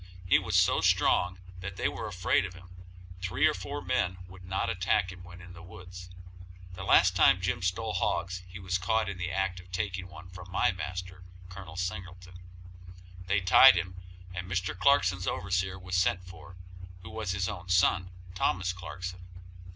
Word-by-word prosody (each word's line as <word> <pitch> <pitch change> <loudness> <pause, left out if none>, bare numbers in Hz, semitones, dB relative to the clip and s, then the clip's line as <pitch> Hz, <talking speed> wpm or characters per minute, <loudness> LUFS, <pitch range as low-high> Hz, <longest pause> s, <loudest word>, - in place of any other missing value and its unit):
He 90 - +5
was 90 -2 -3
so 90 -1 +4
strong 90 +1 +3 0.2
that 95 +1 -6
they - - 0
were - - -4
afraid 95 0 +1
of 95 -3 -6
him; 90 0 -14 0.5
three 90 +1 +1
or - - +4
four - - -6
men 90 +1 0
would 95 0 -13
not 95 +1 -1
attack 95 +1 +1
him 90 -1 -12
when 85 0 -12
in 90 0 -12
the 85 - -12
woods. 90 +1 -11 0.6
The 95 +2 -7
last 90 -1 +5
time 90 +1 +5
Jim 90 -1 -1
stole 95 +5 -1
hogs 90 0 -1
he 90 +1 -10
was 95 -1 -2
caught 110 +4 +1
in 100 -2 -5
the 90 0 -2
act 95 0 -1
of 90 0 -15
taking 90 0 -3
one 85 0 -12
from 90 0 -11
my 90 - +2
master, 90 0 -6 0.3
Col. 90 -2 -10
Singleton. 90 0 -6 0.9
They 100 +1 +2
tied 95 +6 +8
him, 90 +1 -2 0.4
and 90 0 -6
Mr. 95 0 -1
Clarkson's 95 -6 +3
overseer 95 +1 -1
was 95 0 -5
sent 90 0 +1
for, 90 0 -12 0.5
who 85 - -9
was 110 -4 -3
his 90 0 -1
own 90 0 -6
son, 90 0 +3 0.2
Thomas 95 0 0
Clarkson. 90 0 -7
90 Hz, 180 wpm, -29 LUFS, 90-95 Hz, 0.9 s, tied